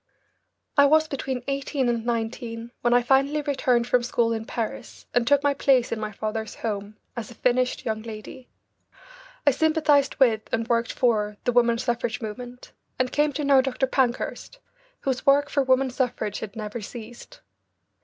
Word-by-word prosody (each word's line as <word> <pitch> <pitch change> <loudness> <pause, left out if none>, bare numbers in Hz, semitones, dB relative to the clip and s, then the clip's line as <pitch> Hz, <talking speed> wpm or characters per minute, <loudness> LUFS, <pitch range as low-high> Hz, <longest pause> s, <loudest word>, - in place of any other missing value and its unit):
I 285 - +8
was 315 +2 +4
between 265 -3 -4
eighteen 275 -1 -1
and 235 -2 0
nineteen 230 0 -3
when 240 - +2
I 245 0 +4
finally 275 +4 +2
returned 260 -4 +1
from 245 0 +2
school 235 -1 +1
in 225 0 -4
Paris 225 -2 -5
and 240 -1 +2
took 285 +1 +4
my 285 0 +3
place 265 -3 +2
in 230 - -2
my 215 -1 -4
father's 220 +1 -4
home 210 -1 -4 0.2
as 235 -3 -5
a 240 - -12
finished 250 +1 0
young 220 -2 -2
lady. 225 +3 -9 1.0
I 285 - +6
sympathised 305 -1 +2
with 235 -6 +3
and 225 0 -1
worked 235 -1 +1
for 210 -4 +1
the 245 - +1
woman 235 -1 +3
suffrage 240 -1 -2
movement, 245 +3 -8 0.3
and 255 0 0
came 295 0 +2
to 295 - -3
know 275 -2 +5
Dr. 265 0 -1
Pankhurst, 260 - -1 0.4
whose 260 -2 -2
work 285 +1 +5
for 280 - +2
woman 260 0 +2
suffrage 245 -5 -2
had 210 -2 -7
never 215 +1 -5
ceased. 240 - -10
245 Hz, 170 wpm, -25 LUFS, 230-270 Hz, 1.0 s, I